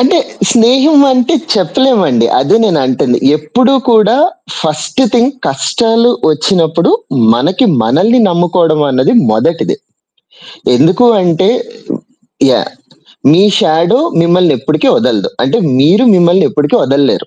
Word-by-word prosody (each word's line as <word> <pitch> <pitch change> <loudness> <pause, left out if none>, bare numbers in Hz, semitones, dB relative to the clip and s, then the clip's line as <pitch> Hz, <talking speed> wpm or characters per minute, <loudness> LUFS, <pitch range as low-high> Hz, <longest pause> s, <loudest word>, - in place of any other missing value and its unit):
అంటే 255 - +2 0.3
స్నేహం 265 +6 +3
అంటే 255 +5 0 0.2
చెప్పలేమండి 195 - 0
అదే 140 - +1
నేను 175 -8 0
అంటంది. 125 -1 -1 0.2
ఎప్పుడూ 245 - 0 0.2
కూడా 220 +1 +2 0.4
ఫస్ట్ 155 - -4
థింగ్ 245 +2 +1 0.2
కష్టాలు 225 - 0 0.2
వచ్చినప్పుడు 165 - 0 0.4
మనకి 185 - 0 0.2
మనల్ని 200 - +1
నమ్ముకోవడమన్నది 160 - 0 0.2
మొదటిది. 165 +10 -1 1.0
ఎందుకు 180 - +2 0.2
అంటే 180 +1 0 1.0
యాహ్! - - -1 0.6
మీ 180 +5 +3 0.2
షాడో 170 +4 +1 0.2
మిమ్మల్ని 175 -1 +2
ఎప్పటికీ 155 - -1
వదలదు. - - -1
అంటే 230 - 0 0.2
మీరు 175 - +2
మిమ్మల్ని 175 +1 +2
ఎప్పటికీ 150 -1 -1
వదలలేరు. 140 +1 -1
175 Hz, 105 wpm, -10 LUFS, 155-230 Hz, 1.0 s, స్నేహం